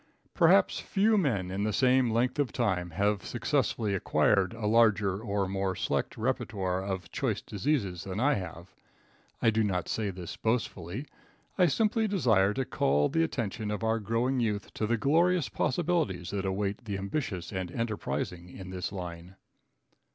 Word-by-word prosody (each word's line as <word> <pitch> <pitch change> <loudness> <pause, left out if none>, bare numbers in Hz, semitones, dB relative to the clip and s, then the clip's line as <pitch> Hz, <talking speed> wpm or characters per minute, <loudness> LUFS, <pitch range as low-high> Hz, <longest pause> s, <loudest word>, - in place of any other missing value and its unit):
Perhaps - - +4
few 215 +2 +2
men 110 - +1
in 100 +2 -2
the 110 - +1
same 130 +2 +3
length 125 +4 +1
of 140 -4 +1
time 95 -8 0
have 100 +4 0
successfully 105 -3 0
acquired 95 0 +2
a 115 -2 -5
larger 105 -3 +3
or 100 -3 -1
more 95 0 -1
select - - -2
repertoire 100 -6 -1
of 95 -3 -4
choice - - -1
diseases 100 - -2
than 95 +1 -4
I 145 +5 +3
have. 85 - -6 0.7
I 115 - +5
do 110 0 +2
not 90 -4 -1
say 110 -2 -1
this 90 -2 -7
boastfully. 110 - -2 0.5
I 180 - +4
simply 220 - +2
desire 110 - +3
to 135 0 -1
call 75 -8 +2
the 165 +3 +1
attention 110 -8 -3
of 105 +1 -3
our 110 0 +1
growing 115 +5 0
youth 105 -4 -2
to 110 - -2
the 120 +1 +1
glorious 165 +6 +2
possibilities 150 - 0
that 100 -1 -2
await 100 +3 -2
the 100 -2 -3
ambitious 95 - -3
and 95 -2 -3
enterprising 95 -5 -3
in 95 +1 -9
this 90 +1 -4
line. 90 -1 -7
105 Hz, 160 wpm, -29 LUFS, 95-125 Hz, 0.7 s, I